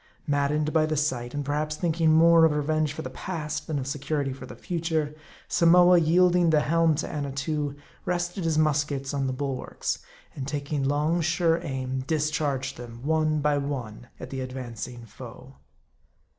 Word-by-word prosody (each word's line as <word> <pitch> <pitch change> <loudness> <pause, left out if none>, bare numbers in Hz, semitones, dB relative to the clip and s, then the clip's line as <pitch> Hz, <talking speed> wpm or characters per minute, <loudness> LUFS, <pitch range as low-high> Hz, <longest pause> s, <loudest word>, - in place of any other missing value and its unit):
Maddened 145 +1 0
by 155 -1 +3
the 155 -1 -1
sight, 130 -4 -1
and 145 -1 -2
perhaps 150 +2 -1
thinking 165 -1 +2
more 165 +1 +6
of 160 - +6
re 150 0 0
venge 155 0 +1
for - - -6
the 130 - -6
past, 155 0 -4
than 155 - -1
of 135 - -3
security 140 0 -2
for 135 - -10
the - - -9
future, 160 -3 -2 0.3
Samoa, 175 +1 +6
yielding 175 +1 +4
the 155 -2 +4
helm 165 +1 +3
to 150 - -3
Annatoo, 145 0 -3 0.3
rested 175 +1 -2
his 160 -2 +1
muskets 145 -2 +1
on 135 -1 0
the - - -1
bulwarks, 130 0 -3 0.4
and 135 -1 -5
taking 145 0 -2
long, 150 +5 +1
sure 165 0 +2
aim, 130 -3 -3
discharged 150 -4 -1
them, 120 0 -10
one 155 -1 +1
by 145 0 +2
one 125 -5 -5
at - - -8
the 135 -1 -3
advancing 125 -2 -6
foe. 70 -9 -12
150 Hz, 170 wpm, -26 LUFS, 135-160 Hz, 0.4 s, more